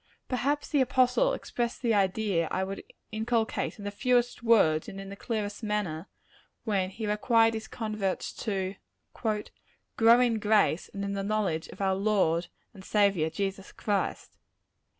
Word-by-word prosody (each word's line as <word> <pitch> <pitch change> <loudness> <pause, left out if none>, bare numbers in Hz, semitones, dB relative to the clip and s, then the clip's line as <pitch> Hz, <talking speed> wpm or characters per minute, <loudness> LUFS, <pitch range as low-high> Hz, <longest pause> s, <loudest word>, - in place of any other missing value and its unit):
Perhaps 275 +4 -1
the 290 - +3
apostle 260 - +3
expressed 240 - -3
the 235 -2 +3
idea 195 -3 +1
I 190 - -1
would 195 +1 -5 0.3
inculcate, 225 +1 -1
in 205 - -9
the 205 - -2
fewest 245 +3 +1
words 200 -10 +3
and 195 - -8
in 195 0 -8
the 200 - -7
clearest 210 -1 -3
manner, 205 -6 -2 0.6
when 195 -5 0
he 220 +3 -6
required 225 +2 +3
his 220 -1 -5
converts 215 -4 -3
to 195 -3 -1 0.4
"grow 225 +2 +1
in 240 -3 +2
grace, 210 -5 +2
and 200 0 -4
in 200 - -2
the 200 - -2
knowledge 195 -6 -1
of - - -10
our 190 -1 +2
Lord 190 -4 +1 0.3
and 190 - -12
Saviour 200 -6 +2
Jesus 195 +3 -4
Christ." 205 -2 -2
210 Hz, 150 wpm, -29 LUFS, 195-225 Hz, 0.6 s, the